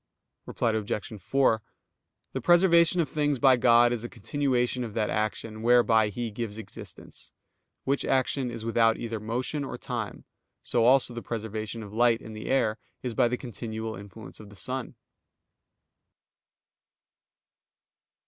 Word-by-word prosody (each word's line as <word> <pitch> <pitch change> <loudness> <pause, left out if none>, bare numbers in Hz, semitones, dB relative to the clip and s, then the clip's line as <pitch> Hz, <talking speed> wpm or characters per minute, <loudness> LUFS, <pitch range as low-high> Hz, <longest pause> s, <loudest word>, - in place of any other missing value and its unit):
Reply 115 - 0
Obj. 105 -1 -3
4: 120 +1 +2 0.7
The - - -3
preservation 175 -1 +5
of 160 - -1
things 145 0 0
by 130 +1 +6
God 120 0 +5
is 120 -2 -4
a 120 - -5
continuation 125 +1 -1
of 115 -3 -7
that 110 -2 0
action 110 0 -2
whereby 115 -2 +4
He 115 +2 -4
gives 110 -1 -5
existence, 110 -3 -9 0.5
which 140 +1 0
action 130 0 +1
is 115 -1 -7
without 115 -1 +3
either 115 -2 -4
motion 125 +7 -2
or 135 - -5
time; - - -5 0.4
so 115 -1 +1
also 130 0 +4
the 120 - -5
preservation 110 0 -5
of 105 0 -10
light 115 0 +3
in 110 - -10
the 110 0 -7
air 115 -4 +1 0.2
is 125 -2 -3
by 120 - +3
the 125 +1 -1
continual 110 -2 -5
influence 100 +3 -11
of 105 -2 -12
the 100 - -14
sun. 125 +5 -5
115 Hz, 145 wpm, -27 LUFS, 110-130 Hz, 0.7 s, by